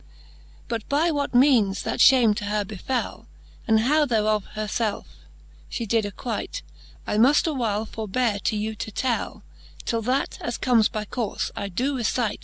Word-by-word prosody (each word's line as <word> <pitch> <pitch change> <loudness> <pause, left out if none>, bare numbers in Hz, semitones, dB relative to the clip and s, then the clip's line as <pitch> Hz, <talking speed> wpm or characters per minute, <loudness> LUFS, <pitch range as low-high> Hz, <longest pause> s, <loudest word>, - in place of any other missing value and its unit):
XVII. - - -26 0.6
But 225 -2 -4
by 310 +4 +2
what 285 -4 -2
meanes 240 -7 +4
that - - -3
fhame 245 -5 +6
to 205 - -3
her 205 0 -1
befell, 215 +6 -4 0.4
And 220 -1 +4
how 295 +5 +3
thereof 215 -3 +1
her 215 0 -2
felfe 215 0 -2 0.7
fhe 230 - -3
did 220 0 +1
acquite, 210 - -5 0.4
I 210 - -1
muft 260 +7 +5
awhile 230 -9 -1
forbeare 220 0 -1
to 215 - +1
you 215 +1 -2
to 215 - -6
tell; 240 +2 -2 0.4
Till 230 -1 -1
that, 255 +5 -1
as 240 - -3
comes 235 -4 +3
by 215 0 -4
courfe, 230 -1 -3
I 200 - -4
doe 255 +10 -1
recite. 235 -2 -1
225 Hz, 170 wpm, -24 LUFS, 210-255 Hz, 0.7 s, fhame